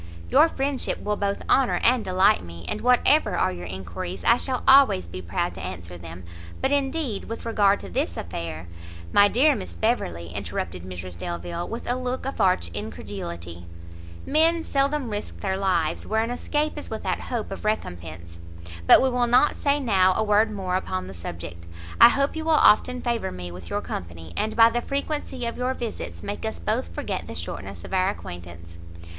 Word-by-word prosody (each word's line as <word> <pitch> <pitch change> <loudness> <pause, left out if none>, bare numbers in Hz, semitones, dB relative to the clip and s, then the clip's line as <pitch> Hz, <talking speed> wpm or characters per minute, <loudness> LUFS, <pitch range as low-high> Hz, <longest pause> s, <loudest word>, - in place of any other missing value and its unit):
"Your 330 - +6
friendship 275 -2 -2
will 210 0 0
both 200 -1 -2
honour 265 -2 +3
and 245 -1 +4
delight 190 +2 +3
me, 85 0 -10
and 100 - -3
whatever 250 +5 +4
are 95 - +2
your 90 -1 -7
enquiries, 90 0 -6
I 235 - +5
shall 255 -1 -2
always 265 - +6
be 85 +2 -7
proud 90 0 -2
to 90 0 -8
answer 90 -1 -7
them; 85 +1 -9 0.4
but 265 - 0
indeed, 280 -5 -1
with 230 +1 -6
regard 205 -3 +3
to - - -8
this 85 0 -2
affair 85 -1 -5 0.2
" 85 0 -14
"My 205 0 +7
dear 280 +8 +4
Miss - - -6
Beverley," 85 - -1
interrupted 90 -1 -4
Mrs 90 -1 -7
Delvile, 170 - -4
with 230 - -6
a 245 - +1
look 255 0 -3
of 270 - -3
arch 180 - +3
incredulity, 85 -3 -7 0.6
"men 325 +2 +3
seldom 275 -4 0
risk 205 0 -5
their 190 -1 -1
lives 185 -5 0
where 220 +1 +1
an 230 - -3
escape 295 +4 -1
is - - -7
without 195 -5 -2
hope 235 -5 -4
of 195 - -6
recompence. 85 - -4 0.5
But - - +8
we 265 - +3
will 245 -1 +1
not 250 +5 +5
now - - -12
say 285 -1 +1 0.3
a - - +3
word 210 +1 +3
more 190 -3 -1
upon 95 - -3
the 95 - -8
subject. 85 0 -8 0.4
I - - +11
hope 275 +4 0
you 320 - -3
will 325 - +2
often 250 -2 +4
favour 235 - -1
me 90 -1 -7
with 85 -1 -10
your - - -1
company, 85 -1 -7
and 220 - -1
by 230 0 +7
the 240 - 0
frequency 275 -2 -3
of 235 - -3
your 255 +1 0
visits, 85 - -6
make - - -5
us - - -3
both - - -1
forget 85 - -4
the - - -7
shortness 85 +2 -6
of - - -8
our 185 0 +3
acquaintance." 85 - -9
190 Hz, 190 wpm, -25 LUFS, -, 0.6 s, I